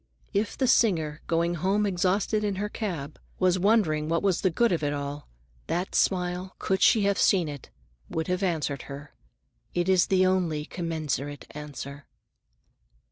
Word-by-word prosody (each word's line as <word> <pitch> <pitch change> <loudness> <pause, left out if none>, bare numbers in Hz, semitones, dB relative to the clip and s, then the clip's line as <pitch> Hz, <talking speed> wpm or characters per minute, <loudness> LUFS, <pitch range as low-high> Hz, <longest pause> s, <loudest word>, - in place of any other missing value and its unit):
If 205 +1 -1
the 265 - +2
singer, 165 -12 +2
going 170 +1 +1
home 195 +5 +1
exhausted 195 +3 +1
in 205 -2 0
her 205 +2 -2
cab, 165 -11 -5 0.2
was 185 0 +2
wondering 175 -7 +2
what 165 +2 +1
was 195 -3 +2
the 190 - +3
good 235 +7 +2
of 170 - 0
it 145 -1 0
all, 145 0 -5 0.4
that 180 +3 -2
smile, 180 0 0
could 190 0 -1
she 220 - +5
have 200 0 +1
seen 180 -5 +4
it, 145 -3 -8 0.4
would 160 0 -2
have 180 +1 -1
answered 155 -7 -1
her. 140 +1 -9 0.6
It 175 0 +1
is 185 -2 +4
the 185 -1 +3
only 175 -5 +1
commensurate 155 -5 -3
answer. 145 -1 -8
175 Hz, 160 wpm, -27 LUFS, 150-195 Hz, 0.6 s, she